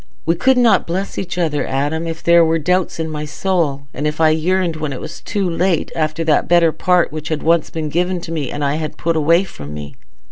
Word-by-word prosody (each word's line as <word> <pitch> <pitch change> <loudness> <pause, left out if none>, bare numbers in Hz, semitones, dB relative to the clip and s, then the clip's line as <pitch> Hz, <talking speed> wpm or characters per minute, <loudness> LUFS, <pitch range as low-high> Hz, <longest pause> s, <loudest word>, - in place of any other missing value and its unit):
We 165 - +3
could 255 +10 +2
not 240 -2 +4
bless 190 +4 -3
each 180 -1 -5
other, 155 -4 0
Adam, 145 +5 -1
if 165 0 -5
there 170 0 +6
were 165 0 +2
doubts 180 +3 0
in 160 - -1
my 150 -1 -4
soul, 150 -3 -1
and 150 +3 -2
if 150 +1 -3
I 160 -1 +5
yearned, 170 +2 +1
when 155 -3 -3
it 125 - -6
was 165 - -8
too 200 -3 -2
late, 175 0 0
after 155 0 -1
that 155 -2 +2
better 170 -1 +4
part 180 +1 +2
which 155 0 -6
had 155 -2 -2
once 165 -1 +2
been 155 -2 -4
given 180 +3 0
me 155 -6 -3
and 145 0 -3
I 140 +2 0
had 155 -2 -5
put 165 0 -1
away 165 +4 +3
from 75 - -9
me." 75 -1 -8
165 Hz, 235 wpm, -18 LUFS, 150-175 Hz, -, there